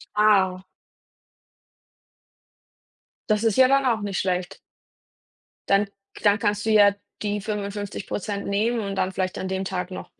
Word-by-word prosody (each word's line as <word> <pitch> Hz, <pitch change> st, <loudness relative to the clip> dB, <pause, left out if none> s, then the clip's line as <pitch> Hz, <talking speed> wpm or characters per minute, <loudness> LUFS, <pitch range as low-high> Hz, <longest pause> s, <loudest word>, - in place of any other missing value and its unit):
Ah. 195 Hz, -3 st, +3 dB, 2.7 s
Das 210 Hz, 0 st, +2 dB
ist 225 Hz, -3 st, +2 dB
ja 260 Hz, -1 st, +7 dB
dann 275 Hz, +1 st, +3 dB
auch 230 Hz, -4 st, +1 dB
nicht 200 Hz, -2 st, -2 dB
schlecht. 185 Hz, 0 st, -2 dB, 1.1 s
Dann 200 Hz, +1 st, +4 dB, 0.3 s
k -, -, -13 dB
dann 205 Hz, 0 st, +4 dB
kannst 205 Hz, -1 st, 0 dB
du -, -, 0 dB
ja 205 Hz, -2 st, +6 dB, 0.3 s
die 210 Hz, 0 st, -1 dB
55% 205 Hz, -1 st, -4 dB
nehmen 220 Hz, +4 st, +1 dB
und 200 Hz, -2 st, -3 dB
dann 190 Hz, -1 st, 0 dB
vielleicht 185 Hz, -1 st, -2 dB
an 190 Hz, -, -3 dB
dem 190 Hz, 0 st, -2 dB
Tag 180 Hz, -1 st, -3 dB
noch 185 Hz, -, -8 dB
205 Hz, 140 wpm, -24 LUFS, 190-215 Hz, 2.7 s, ja